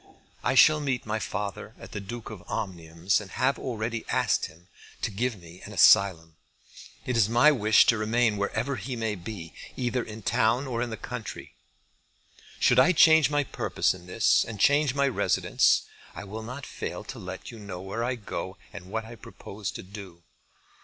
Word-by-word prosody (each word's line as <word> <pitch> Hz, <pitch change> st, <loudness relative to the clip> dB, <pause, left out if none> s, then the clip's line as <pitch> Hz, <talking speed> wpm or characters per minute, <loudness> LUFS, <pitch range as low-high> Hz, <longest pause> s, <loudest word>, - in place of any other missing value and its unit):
I 130 Hz, -, +1 dB
shall 155 Hz, +3 st, +7 dB
meet 135 Hz, -4 st, -2 dB
my 110 Hz, +1 st, -2 dB
father 100 Hz, -1 st, -5 dB
at -, -, -12 dB
the -, -, -4 dB
Duke 110 Hz, +3 st, -7 dB
of 105 Hz, -5 st, -9 dB
Omnium's, 90 Hz, -2 st, -2 dB
and 100 Hz, -, -10 dB
have 130 Hz, +7 st, 0 dB
already 115 Hz, -2 st, -3 dB
asked 125 Hz, -4 st, +1 dB
him 85 Hz, +3 st, -19 dB, 0.4 s
to -, -, -1 dB
give 115 Hz, +1 st, -2 dB
me 85 Hz, +1 st, -14 dB
an -, -, -9 dB
asylum. 80 Hz, -5 st, +4 dB, 0.7 s
It 125 Hz, -, -1 dB
is 110 Hz, -2 st, +3 dB
my 120 Hz, +6 st, +6 dB
wish 110 Hz, -6 st, +5 dB
to 115 Hz, -, +3 dB
remain 110 Hz, 0 st, +1 dB
wherever 125 Hz, +7 st, -2 dB
he 130 Hz, -1 st, -5 dB
may 110 Hz, -2 st, -2 dB
be, 90 Hz, -3 st, -8 dB, 0.2 s
either 125 Hz, 0 st, -1 dB
in 110 Hz, 0 st, -9 dB
town 115 Hz, +8 st, +2 dB
or 120 Hz, -3 st, -3 dB
in 120 Hz, -, -2 dB
the 110 Hz, -, -5 dB
country. 120 Hz, -2 st, -7 dB, 1.1 s
Should -, -, +4 dB
I 180 Hz, -, +6 dB
change 160 Hz, -2 st, +6 dB
my 145 Hz, 0 st, +1 dB
purpose -, -, 0 dB
in 90 Hz, -1 st, -13 dB
this, 100 Hz, +3 st, +3 dB
and 110 Hz, -3 st, -8 dB
change 145 Hz, +3 st, +3 dB
my 140 Hz, 0 st, +2 dB
residence, 135 Hz, -, +2 dB, 0.3 s
I -, -, -7 dB
will 105 Hz, +3 st, -7 dB
not 125 Hz, +5 st, -7 dB
fail -, -, -6 dB
to -, -, -8 dB
let 95 Hz, +4 st, -8 dB
you 115 Hz, -, -11 dB
know 100 Hz, -4 st, -7 dB
where 100 Hz, +5 st, -4 dB
I 125 Hz, +1 st, -1 dB
go 100 Hz, -3 st, -6 dB, 0.2 s
and 100 Hz, -3 st, -9 dB
what 110 Hz, +3 st, -4 dB
I 115 Hz, -, -10 dB
propose 100 Hz, -2 st, -8 dB
to -, -, -7 dB
do. 95 Hz, -3 st, -11 dB
110 Hz, 185 wpm, -27 LUFS, 100-125 Hz, 1.1 s, shall